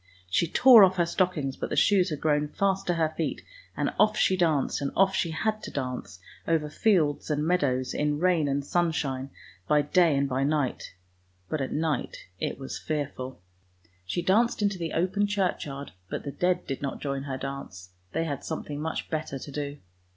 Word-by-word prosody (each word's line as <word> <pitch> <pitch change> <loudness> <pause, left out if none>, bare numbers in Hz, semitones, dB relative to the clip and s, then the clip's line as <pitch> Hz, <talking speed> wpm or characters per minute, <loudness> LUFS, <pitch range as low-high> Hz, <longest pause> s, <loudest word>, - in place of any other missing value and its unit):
She 170 - +2
tore 240 +4 +8
off 190 0 +5
her 175 -2 +2
stockings, 170 -7 0
but - - -4
the - - -2
shoes 190 -3 +4
had 150 -3 -4
grown 150 -1 +2
fast 195 +4 0
to 175 - +2
her 160 -1 +1
feet, 160 0 -3 0.3
and - - 0
off 215 0 +4
she 190 - +3
danced, 160 -6 +1
and 140 - -1
off 195 0 +4
she 170 - 0
had 215 +7 -1
to - - -6
dance 125 -8 -5 0.3
over 160 -2 +1
fields 160 -7 +2
and 150 0 0
meadows, 140 -7 +1
in 150 0 0
rain 170 -2 +2
and 140 0 -1
sun 175 +1 +1
shine, 135 -3 -2 0.4
by 150 -1 +4
day 160 0 +3
and 140 0 +1
by 135 0 0
night, 145 -8 -1 0.5
but 155 - -1
at 135 - -3
night 155 -4 -2
it - - -2
was 135 0 -6
fearful. 130 -7 -4 0.6
She 130 - -3
danced 220 +3 +2
into 200 -2 0
the 165 -2 -3
open 190 +4 +1
churchyard, 175 -8 -2 0.2
but - - -4
the 140 - -4
dead 180 +3 0
did 135 - -4
not 140 -1 -3
join 140 -1 -3
her 135 -2 -3
dance, 130 -10 -7 0.2
they 165 - 0
had 145 -4 -4
something 150 -2 -5
much 160 +1 -3
better 155 -3 -3
to 140 - -9
do. 145 0 -4
155 Hz, 195 wpm, -27 LUFS, 140-180 Hz, 0.6 s, tore